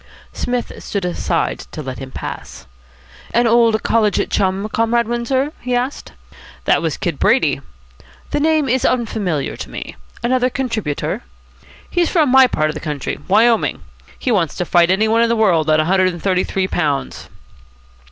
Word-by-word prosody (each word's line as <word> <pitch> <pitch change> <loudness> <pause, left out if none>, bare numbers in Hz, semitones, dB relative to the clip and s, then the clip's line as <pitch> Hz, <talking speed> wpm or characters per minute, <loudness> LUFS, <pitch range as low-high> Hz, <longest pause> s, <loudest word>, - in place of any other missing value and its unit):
Psmith 245 -1 -2
stood 200 -3 -3
aside 175 -1 -1
to 155 - -6
let 130 -1 -6
him 135 -1 -7
pass. - - -7 0.7
"An 240 +1 +4
old 230 -1 +3
college 215 -2 +1
chum, 195 +1 0
Comrade 230 +1 +1
Windsor?" 260 +5 -1
he 250 0 -1
asked. 250 +3 -3 0.5
"That - - +3
was - - -2
Kid - - -3
Brady." - - +2 0.7
"The - - 0
name 310 -1 +2
is 260 +1 +1
unfamiliar 210 - -1
to - - -7
me. - - -7 0.3
Another 250 +1 +2
contributor?" 225 - -2 0.7
"He's 350 -1 +1
from 315 -6 +3
my 265 0 +7
part 155 -8 0
of - - -9
the 155 - -6
country 150 -3 -4
Wyoming. 225 +4 +3 0.3
He 255 - -1
wants 175 -8 +1
to 180 - -2
fight 175 0 +4
any 200 +4 +3
one 225 +1 +3
in 235 - +3
the 235 - +2
world 175 -8 +2
at 155 0 +4
a 155 - +2
hundred 185 +2 +3
and 175 -2 -3
thirty 185 -2 +2
three 190 -1 -1
pounds." 150 -7 -2
220 Hz, 170 wpm, -18 LUFS, 175-245 Hz, 0.7 s, my